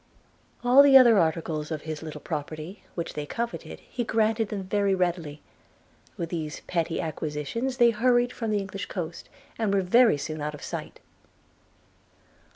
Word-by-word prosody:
All 250 +3 +7
the 280 -1 +8
other 235 -5 +7
articles 160 -2 -1
of 155 -2 -4
his 155 -2 -5
little 155 -2 -7
property, 155 +4 -6
which 170 - -4
they 150 -1 -5
coveted, 235 +6 -5
he 245 - -4
granted 225 -1 +1
them 200 -2 -4
very 200 0 +1
readily: 170 -5 -2 0.7
with 170 - -3
these 155 -3 -4
petty 165 -1 -2
acquisitions 160 - -3
they 240 -2 +6
hurried 245 +2 +2
from 225 -2 -4
the 210 - +1
English 195 0 -5
coast, 170 -3 -6 0.3
and 220 -3 +1
were 195 -1 +2
very 225 -1 +5
soon 155 +2 -5
out 150 0 -3
of 145 - -12
sight. - - -6
185 Hz, 160 wpm, -26 LUFS, 155-225 Hz, 0.7 s, the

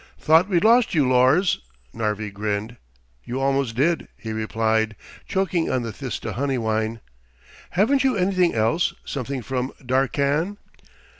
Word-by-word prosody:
"Thought 165 +5 +4
we'd 175 -2 +2
lost 230 -2 +4
you, 145 -4 +3
Lors," 130 +9 +3 0.3
Narvi 105 -1 -2
grinned. 105 +3 -3 0.5
"You 125 +2 -4
almost 135 -3 0
did," 160 +6 +1
he 110 - -6
replied, 110 0 0 0.3
choking 190 -3 0
on 125 - 0
the 115 - -4
Thista 125 -1 -5
honeywine. 115 -4 -1 0.8
"Haven't 265 +8 +3
you 260 -5 +2
anything 185 -3 +2
else, 115 +10 +1
something 135 -1 -4
from 130 +1 -2
Darkkan?" 140 - 0
130 Hz, 130 wpm, -23 LUFS, 110-170 Hz, 0.8 s, Thought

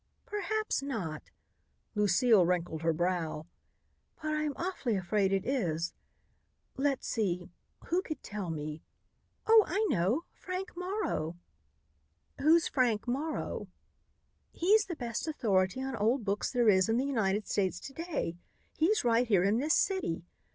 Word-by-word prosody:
"Perhaps 420 -2 -1
not," 205 - -4 0.6
Lucile 210 0 +4
wrinkled 175 -2 -1
her 165 0 +2
brow, 165 -2 -1 0.7
"but 310 0 -2
I 305 - 0
am 295 - -1
awfully 335 - -2
afraid 195 +1 +1
it 195 0 0
is. 175 - -1 0.8
Let's 275 0 0
see 180 -7 -1 0.3
who 355 +2 +1
could 310 -7 -6
tell 205 -4 -5
me? 155 0 -4 0.6
Oh, 445 -1 +7
I 405 +6 +1
know 200 - +1
Frank 370 0 -5
Morrow!" 360 - -2 1.0
"Who's 320 +3 +5
Frank 240 -4 +1
Morrow?" 290 +6 -2 0.8
"He's 405 +4 +3
the 350 - -4
best 235 0 -4
authority 210 -5 +1
on 265 0 -3
old 225 +3 +1
books 200 0 -1
there 245 -3 +2
is 190 -1 +5
in 225 - +2
the 260 - +1
United 215 -6 0
States 190 -3 0
to 270 - -8
day. 305 - -3 0.4
He's 370 +7 +2
right 240 +1 +3
here 195 -5 +4
in 205 +4 +2
this 305 +4 +2
city. 365 - 0
230 Hz, 140 wpm, -31 LUFS, 185-310 Hz, 1.0 s, Oh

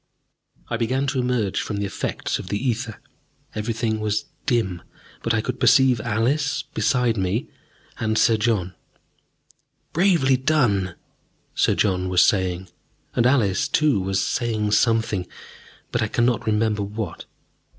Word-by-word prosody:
I 115 - -2
began 130 +4 0
to 130 -1 -1
emerge 120 -6 0
from 105 - -4
the 100 - -1
effect 100 - -3
of - - -8
the 100 - -1
ether. 115 -2 -2 0.5
Everything 110 0 -2
was 105 0 -1 0.2
dim, 110 -10 0 0.4
but 115 - -1
I 110 -1 +2
could 125 +2 -4
perceive 125 -1 +5
Alice 125 +7 0
beside 120 -3 +1
me, 95 +5 -1 0.5
and 110 0 0
Sir 115 - +4
John. 105 -5 0 1.2
"Bravely 165 -7 +3
done!" 120 - +1 0.6
Sir - - +2
John 95 -2 +1
was 90 -1 +5
saying, 95 -1 0 0.5
and 120 - +3
Alice, 125 0 +2
too, 145 -6 +2
was 95 0 0
saying 110 +1 -1
something, 110 -4 +2 0.6
but - - 0
I - - +1
cannot 120 -2 0
remember 105 -1 +1
what. 105 +2 -5
110 Hz, 135 wpm, -23 LUFS, 100-125 Hz, 1.2 s, perceive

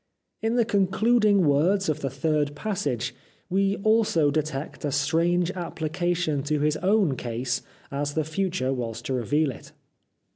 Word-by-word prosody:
In 225 +2 0
the 235 -2 +3
concluding 205 0 +3
words 175 +8 +3
of 155 - 0
the 135 - -2
third 145 +2 0
passage 145 - -2 0.4
we 195 +1 +2
also 215 -9 +3
detect 150 -1 -3
a 145 - -1
strange 165 +5 +1
application 170 -2 -2
to 150 0 0
his 150 +1 +1
own 190 -6 +2
case 120 +1 -2 0.3
as 145 +1 -2
the 160 - +1
future 160 -4 -1
was 115 -3 -4
to 135 - -3
reveal 140 +5 +1
it. 120 - -13
155 Hz, 145 wpm, -25 LUFS, 140-190 Hz, 0.4 s, the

